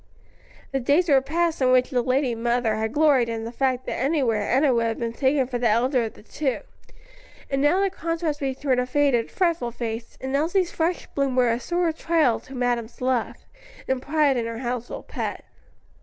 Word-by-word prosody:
The 270 - 0
days 290 +8 +2
were 275 -2 +5
past 325 +3 -1
in 255 -1 +4
which 255 +2 +3
the 250 -2 +2
lady 255 0 +1
mother 235 0 0
had 220 0 -2
gloried 285 -5 +3
in 225 -1 -3
the 230 - -5
fact 255 0 -1
that - - -3
anywhere 255 -7 0
Enna 270 +1 +3
would 230 -1 +1
have 225 - -2
been 230 -1 -3
taken 265 +2 +2
for 245 -1 -4
the 235 -1 +2
elder 240 +3 +2
of 220 - -7
the - - -16
two; 265 +3 -2 0.9
and 275 0 +1
now 295 +6 +3
the 390 -1 +1
contrast 330 -3 -2
between 265 -1 0
her 250 - +1
faded, 260 -3 +2
fretful 335 -9 0
face 230 -1 -6
and 265 +1 -3
Elsie's 345 +5 +1
fresh 335 +2 -1
bloom 275 -2 0
was 245 -2 +3
a - - -5
sore 345 +4 0
trial 315 -6 +1
to 270 - -12
madam's 245 -2 -2
love, 255 -2 -1 0.4
and 260 -1 0
pride 290 -2 +2
in 230 -1 -1
her 230 0 -5
household 245 -1 -5
pet. - - -4
260 Hz, 200 wpm, -24 LUFS, 240-295 Hz, 0.9 s, were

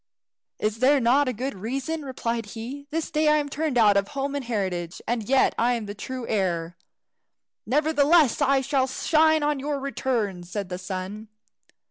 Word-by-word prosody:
"Is 215 +1 -2
there 275 +3 +5
not 255 +1 +3
good 260 +5 -3
reason?" 270 +10 -4
replied 235 -4 -3
he. 270 +6 -7
"This 320 +1 -3
day 305 0 +2
I 300 0 +5
am 290 -1 -1
turned 295 -2 -1
out 210 -3 +5
of 200 0 +1
home 275 +1 -3
and 285 -1 -3
heritage, 185 -7 -3
and 230 -2 -2
yet 270 0 +4
I 240 +2 +3
am 230 -3 -4
the 205 - -6
true 255 +3 -6
heir." 175 -5 -1 0.9
"Nevertheless 300 +1 +3
I 275 -1 +3
shall 265 -1 +1
shine 315 +3 +3
on 295 -1 0
your 285 +1 -2
return," 245 -8 -2
said 185 +2 -5
the 180 0 -5
sun. 190 +4 -6
255 Hz, 170 wpm, -25 LUFS, 210-285 Hz, 0.9 s, there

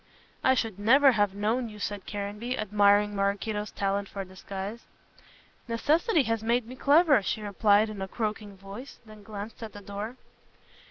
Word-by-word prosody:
"I 260 - +5
should 225 -6 -2
never 265 +6 +6
have 205 -4 +1
known 225 +4 0
you," 210 - -11
said 205 -1 -5
Caranby, 210 +5 -4
admiring 205 0 +3
Maraquito's 205 +2 -1
talent 200 0 -2
for 195 -1 -5
disguise. 195 +4 -7 0.8
"Necessity 305 - +2
has 225 -2 -1
made 235 +1 +1
me 250 +3 -9
clever," 290 -1 +5
she 215 +2 -3
replied 205 +1 +3
in 210 -2 -7
a 190 - -3
croaking 210 -1 -4
voice, 195 +8 -10
and 215 -1 -13
glanced 210 +1 -8
at 220 -2 -7
the 205 - -9
door. 205 +5 -6
210 Hz, 160 wpm, -28 LUFS, 200-230 Hz, 0.8 s, never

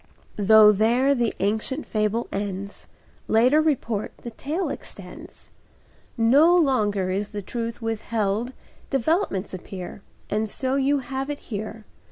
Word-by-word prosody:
Though 210 +1 +7
there 235 +7 +3
the 240 -4 +1
ancient 220 +8 -1
fable 215 +2 -1
ends, 200 0 -5 0.4
Later 250 +7 +4
report 235 -9 -1
the 235 - -8
tale 305 - -3
extends, - - -10 0.7
No 280 +10 +5
longer 210 - +2
is 200 +2 -2
the 205 -1 -6
truth 230 +2 -5
withheld; 225 +1 -1 0.4
Developments 270 - 0
appear, 185 +1 -7 0.3
And 215 +1 -1
so 260 +5 -2
you 275 +1 +2
have 270 +1 -4
it 290 - -3 0.2
here. 215 +1 -5
225 Hz, 125 wpm, -24 LUFS, 205-265 Hz, 0.7 s, Though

